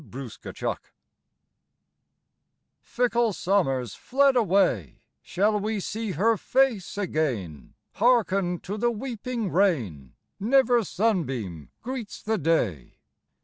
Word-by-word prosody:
FICKLE 130 0 -8
SUMMER - - -5 2.0
Fickle 235 -2 +1
Summer's 170 - 0
fled 275 +1 +2
away, 185 - +1 0.2
Shall 210 +3 +1
we 215 +1 -2
see 215 +1 -4
her 220 +7 +2
face 240 -7 +1
again? 130 - -3 0.2
Hearken 195 -7 +2
to 205 +3 -5
the 240 +3 +2
weeping 235 -3 -4
rain, 115 - 0 0.2
Never 245 +1 +3
sunbeam 135 - -2
greets 245 -3 -5
the 220 -1 0
day. 120 - 0
200 Hz, 100 wpm, -26 LUFS, 140-230 Hz, 2.0 s, Never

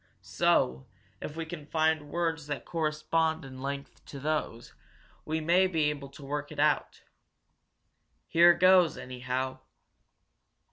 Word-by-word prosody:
So, 65 +1 +1 0.3
if 150 - -6
we 165 0 -4
can 160 -3 -8
find 155 -1 +1
words 165 -2 -2
that 145 -1 -4
correspond 160 -1 -1
in 130 -1 -10
length 140 +1 -6
to 140 - -9
those, 145 -5 -3 0.5
we 160 +1 -1
may 175 +4 +3
be 160 -5 +1
able 140 -2 -7
to 140 +1 -12
work 145 +1 -4
it 150 - -8
out. 150 0 +1 1.2
Here 170 +1 +6
goes, 185 -2 +5
anyhow!" 130 +1 -4
150 Hz, 130 wpm, -29 LUFS, 140-160 Hz, 1.2 s, Here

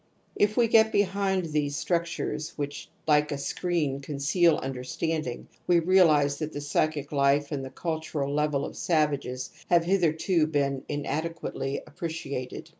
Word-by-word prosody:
If 210 +1 +2
we 240 -1 +5
get 220 -1 +5
behind, 195 -2 +1
these 150 -2 -1
structures, 170 -1 -2
which 145 -1 -5 0.2
like 150 -1 +3
a 145 - -1
screen 150 -2 -1
conceal 145 +4 +2
understanding, 135 +2 -3 0.2
we 175 -1 +5
realize 160 -5 +4
that 155 -1 -4
the - - -4
psychic 145 0 -1
life 140 0 +2
and 140 -3 -2
the 130 - -6
cultural 155 -3 -3
level 150 -1 +1
of - - -8
savages 145 -6 0 0.2
have 170 -1 +5
hitherto 170 -2 +2
been 140 -3 0
inadequately 145 -1 -3
appreciated. 150 -5 -5
150 Hz, 135 wpm, -27 LUFS, 140-170 Hz, 0.2 s, we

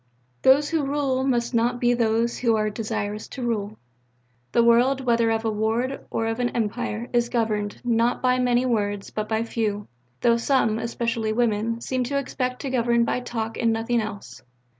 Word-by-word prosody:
"Those 285 +3 +5
who 320 -3 0
rule 275 -2 0
must 240 -2 0
not 235 +1 +1
be 245 0 +3
those 230 0 +1
who 230 -3 +2
are 215 -1 0
desirous 210 -1 -4
to 260 - -7
rule." 215 -3 -2 0.7
"The 235 - +4
world, 245 +3 +4
whether 235 -2 +2
of 225 0 0
a 220 - +1
ward 225 +5 -1
or 225 - -1
of 225 +1 -2
an 245 0 +1
Empire, 230 0 -2
is 240 0 +2
governed, 215 -4 -1
not 235 +1 +2
by 255 0 +2
many 250 0 +2
words, 205 -4 -1
but 215 0 -4
by 220 0 +1
few; 215 -3 -2 0.3
though 235 -1 +4
some, 230 -3 +1
especially 230 -1 -2
women, 230 0 0
seem 255 0 -1
to 280 +3 -1
expect 255 -2 -3
to 270 - -3
govern 235 -2 +2
by 250 - 0
talk 225 -2 -4
and 230 -1 +2
nothing 225 +1 0
else." 200 - -7
235 Hz, 180 wpm, -24 LUFS, 220-245 Hz, 0.7 s, Those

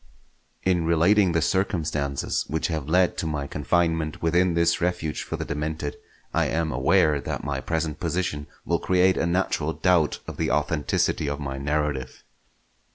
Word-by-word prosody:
In 90 -2 +2
relating 85 +3 +4
the 80 -1 +2
circumstances 75 -8 -1
which 80 +2 -1
have 75 -3 -3
led 90 +2 +3
to 80 - -2
my 75 -2 -2
confinement 80 +2 0
within 85 +1 +2
this 85 0 +2
refuge 85 -3 -1
for - - -4
the - - -4
demented, 75 0 -3 0.4
I - - +2
am 80 0 -1
aware 75 -2 +3
that - - -4
my 70 -2 -2
present 80 -1 -2
position 85 -4 -2 0.2
will - - +1
create 95 0 +3
a 80 - +1
natural 85 -3 0
doubt 90 -5 +2
of - - -8
the - - 0
authenticity 75 -1 0
of 70 0 -3
my 70 -2 -4
narrative. 75 -2 -2
80 Hz, 160 wpm, -25 LUFS, 75-85 Hz, 0.4 s, relating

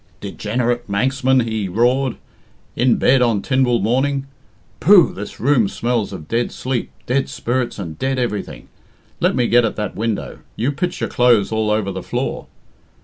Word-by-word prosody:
"Degenerate 120 +4 -2
Manxman!" 130 +5 +2
he 110 -3 -2
roared. 125 +6 +1 0.6
"In 125 0 +3
bed 130 0 +3
on 115 -5 +2
Tynwald 125 -5 +1
morning. 135 +5 0 0.5
Pooh! - - +6
this - - -8
room 125 -4 +3
smells 120 -3 -1
of 75 - -8
dead 115 +4 -1
sleep, 130 -2 -3 0.2
dead 135 +2 0
spirits, 120 0 -2
and 80 -6 -7
dead 135 0 -1
everything. 105 - -3 0.5
Let - - +2
me 125 - +2
get 120 +1 +4
at 115 - -1
that 105 -2 -4
window 110 -1 -3 0.2
you 125 +6 0
pitch 175 +5 -3
your - - -1
clothes 120 -5 +3
all 110 -1 0
over 105 -2 0
the 95 0 -5
floor. - - -3
120 Hz, 160 wpm, -19 LUFS, 105-130 Hz, 0.6 s, Pooh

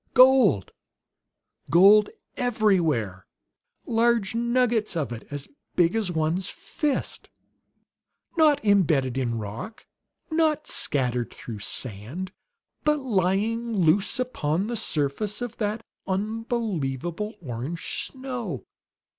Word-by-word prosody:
Gold 255 - +6 1.0
gold 200 +5 +7 0.3
everywhere; 175 - +1 0.6
large 230 -3 +2
nuggets 235 -3 +1
of 150 -6 -1
it, 115 -2 -7
as 145 -1 -5 0.3
big 175 +2 +3
as 215 -5 0
one's 160 +3 0
fist! 295 -3 -3 1.1
Not 300 -6 +4
embedded 155 - +3
in 120 -3 -1
rock, 110 - -7 0.5
not 315 -1 +2
scattered 125 -4 0
through 110 -3 -8
sand, 125 - -5 0.5
but 300 0 +3
lying 225 -1 0
loose 185 - +3
upon 190 -9 -1
the 235 +2 -3
surface 200 +1 -1
of 245 -2 -5
that 215 +1 -2 0.2
unbelievable 205 - -2
orange 140 +2 -4
snow! 260 -3 -5
200 Hz, 95 wpm, -26 LUFS, 145-235 Hz, 1.1 s, gold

